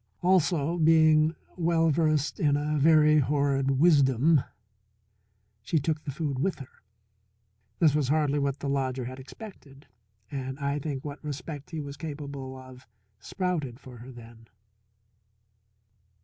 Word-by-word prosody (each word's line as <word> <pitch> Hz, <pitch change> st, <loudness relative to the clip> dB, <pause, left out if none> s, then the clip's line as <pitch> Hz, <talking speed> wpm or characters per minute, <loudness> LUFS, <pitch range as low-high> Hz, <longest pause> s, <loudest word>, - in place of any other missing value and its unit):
Also, 175 Hz, -3 st, +2 dB
being 155 Hz, 0 st, +4 dB, 0.2 s
well 165 Hz, -1 st, +2 dB
versed 155 Hz, -1 st, 0 dB
in 145 Hz, -2 st, +2 dB
a 150 Hz, +1 st, -1 dB
very 155 Hz, 0 st, +5 dB
horrid 135 Hz, -1 st, +1 dB
wisdom, 145 Hz, -2 st, +4 dB, 1.2 s
she 135 Hz, +9 st, -1 dB
took 155 Hz, +1 st, -1 dB
the 140 Hz, -, -4 dB
food 140 Hz, -2 st, -3 dB
with 190 Hz, +6 st, -1 dB
her. 135 Hz, -3 st, -13 dB, 1.0 s
This 155 Hz, -5 st, +4 dB
was 150 Hz, -3 st, +1 dB
hardly 145 Hz, 0 st, +1 dB
what 140 Hz, 0 st, -2 dB
the -, -, -3 dB
lodger 130 Hz, -2 st, -1 dB
had 130 Hz, +2 st, -7 dB
expected, 140 Hz, -, -12 dB, 0.5 s
and 130 Hz, -1 st, -5 dB
I 140 Hz, 0 st, -2 dB
think 140 Hz, -2 st, -5 dB
what 145 Hz, +1 st, -7 dB
respect 145 Hz, 0 st, -7 dB
he 160 Hz, -, -5 dB
was 140 Hz, -1 st, -8 dB
capable 140 Hz, -4 st, -7 dB
of 130 Hz, -1 st, -14 dB, 0.3 s
sprouted 145 Hz, -, -3 dB
for 130 Hz, -3 st, -12 dB
her 125 Hz, +3 st, -11 dB
then. 115 Hz, -1 st, -14 dB
145 Hz, 135 wpm, -27 LUFS, 135-155 Hz, 1.2 s, very